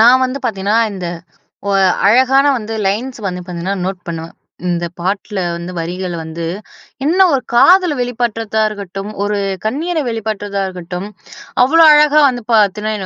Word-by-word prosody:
நான் 250 +3 +6
வந்து 255 +2 -2
பார்த்தீங்கன்னா 210 -1 0
இந்த 185 -3 -5 0.6
ஒ - - +1 0.4
அழகான 260 +5 +4
வந்து 225 0 -6
லைன்ஸ் 240 +7 -2
வந்து 180 -1 -3
பார்த்தீங்கன்னா 180 +2 -4
நோட் 190 -1 -3
பண்ணுவேன். 165 0 -6 0.3
இந்த 175 -1 -1 0.2
பாட்ல 195 +3 -2 0.2
வந்து 170 +1 -6
வரிகள் 175 +2 -4
வந்து 160 +1 -6 0.6
என்ன 350 +6 +3
ஒரு 270 - +1
காதலை 355 +7 +5
வெளிப்படுத்திறதா 230 -3 -2
இருக்கட்டும் 200 -1 -7
ஒரு 205 0 -1 0.3
கண்ணீரை 315 +8 -1
வெளிப்படுத்திறதா 205 -3 -3
இருக்கட்டும். 180 +1 -6 0.6
அவ்வளோ 330 +6 +5
அழகா 300 0 +5
வந்து 245 -2 -5
பார்த்தீங்கன்னா, 210 0 +2
210 Hz, 140 wpm, -16 LUFS, 185-250 Hz, 0.6 s, நான்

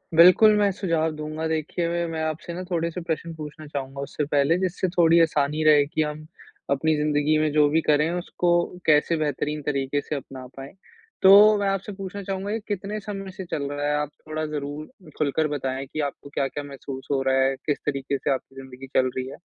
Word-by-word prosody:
बिल्कुल, 185 +6 +8
मैं 205 -1 +3
सुझाव 165 -4 0
दूँगा। 155 +1 -5
देखिए 160 +2 -2
मैं 170 0 -1
मैं 160 -1 -3
आपसे 160 +2 -4
ना 180 +2 -5
थोड़े 170 -2 0
से 180 - -5
प्रश्न 165 0 -3
पूछना 155 0 -9
चाहूँगा 140 -1 -5
उससे 145 +1 -3
पहले, 145 +3 +2
जिससे 185 0 -1
थोड़ी 170 -1 +4
आसानी 150 -1 +1
रहे 150 -2 +6
कि 155 - -1
हम 150 0 -3 0.5
अपनी 155 +3 +2
ज़िन्दगी 150 0 +2
में 155 -1 +1
जो 150 -1 +5
भी 160 +2 +2
करें, 150 +1 +2
उसको 175 0 -2 0.4
कैसे 155 +2 +4
बेहतरीन 150 0 -2
तरीके 140 0 -1
से 150 - -4
अपना 135 -2 -8
पाएँ? 135 +1 -9 0.5
तो 205 +2 +8
मैं 200 -1 0
आपसे 195 +2 -2
पूछना 195 +1 -7
चाहूँगा 195 +1 -3
कि 225 - -1
कितने 205 +1 -3
समय 195 -2 -6
से 185 0 -8
चल 145 - -1
रहा 145 0 -3
है 150 - +1
आप 150 - -3 0.2
थोड़ा 155 0 -3
ज़रूर 150 - -7
खुलकर 155 +1 +1
बताएँ 135 -2 -3
कि 145 +3 -7
आपको 140 - -15
क्या-क्या 140 0 -2
महसूस 135 -1 -8
हो 135 -1 +1
रहा 130 - +3
है? 135 0 +1
किस 145 - 0
तरीके 140 -1 -1
से 135 - -1
आपकी 135 0 -7
ज़िन्दगी 130 0 -10
चल 130 0 +4
रही 130 0 -2
है? - - -9
155 Hz, 205 wpm, -24 LUFS, 140-170 Hz, 0.5 s, बिल्कुल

